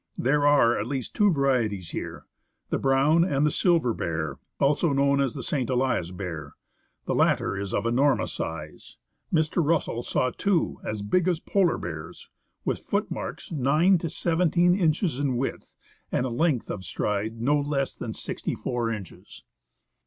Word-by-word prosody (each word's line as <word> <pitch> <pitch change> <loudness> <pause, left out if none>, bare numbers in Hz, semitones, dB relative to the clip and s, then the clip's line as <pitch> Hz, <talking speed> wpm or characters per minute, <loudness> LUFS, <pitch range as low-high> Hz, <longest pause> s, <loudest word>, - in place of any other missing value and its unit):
There 145 +3 +2
are, 130 -5 +4
at - - -3
least, 135 -4 -4
two 205 -1 +4
varieties 120 - 0
here - - -6 0.2
— - - -51
the - - +1
brown 140 +5 +4
and 150 -5 +1
the 150 - +2
silver 165 - +2
bear, 80 -5 -3 0.2
also 145 +2 +2
known 140 0 +3
as 135 -4 -1
the 135 - -5
St. 130 -2 -1
Elias 125 -8 +1
bear. 90 -4 -6 0.5
The - - -1
latter - - +2
is 100 -1 -4
of 100 - -1
enormous 130 +5 +2
size. 80 -2 -6 0.3
Mr. 160 +1 +2
Russell 150 -6 0
saw 125 +1 0
two 195 +1 0
as 105 -1 -4
big 175 - +1
as 175 -3 +1
polar 185 -2 +1
bears, 80 -2 -8 0.3
with - - 0
footmarks - - -3
9 160 +6 +3
to 165 - -3
17 175 +2 +2
inches 165 - +1
in 135 -4 0
width 135 +2 -4 0.4
and 125 - +1
a - - -1
length 130 +1 0
of 95 - -5
stride 105 +3 -2
of 115 - -10
no 145 +4 +3
less 140 -1 -1
than 110 -2 -6
64 120 -2 -3
inches. 105 -6 -8
135 Hz, 165 wpm, -26 LUFS, 115-160 Hz, 0.5 s, are